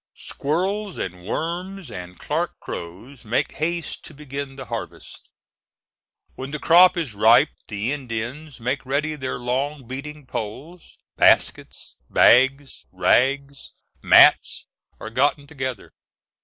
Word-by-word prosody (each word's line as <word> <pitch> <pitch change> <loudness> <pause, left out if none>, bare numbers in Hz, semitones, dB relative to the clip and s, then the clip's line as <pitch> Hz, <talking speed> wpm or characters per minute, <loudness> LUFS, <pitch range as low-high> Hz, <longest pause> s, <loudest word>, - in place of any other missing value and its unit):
Squirrels, 190 +7 -3
and 90 -1 -6
worms, 175 - -4
and 90 -2 -9
Clarke - - -3
crows, 105 +11 -9
make 115 +2 -1
haste 170 0 -3
to 155 - -12
begin 140 -1 -7
the 135 -1 -8
harvest. 115 -2 -8 1.0
When 130 +1 -7
the 150 - -4
crop 175 +5 +6
is 155 -10 -3
ripe 115 +8 +5 0.2
the 105 +3 -3
Indians 130 +2 -5
make 130 +4 -2
ready 140 +4 -1
their 130 -4 -4
long 130 +3 -3
beating 145 +3 -7
poles; 130 +9 -8 0.2
baskets, - - +2
bags, 135 +3 +3
rags, 140 +2 +1 0.3
mats, - - +5 0.3
are 110 - -8
gotten 140 +4 +1
together. 130 -6 -6
135 Hz, 115 wpm, -22 LUFS, 120-150 Hz, 1.0 s, crop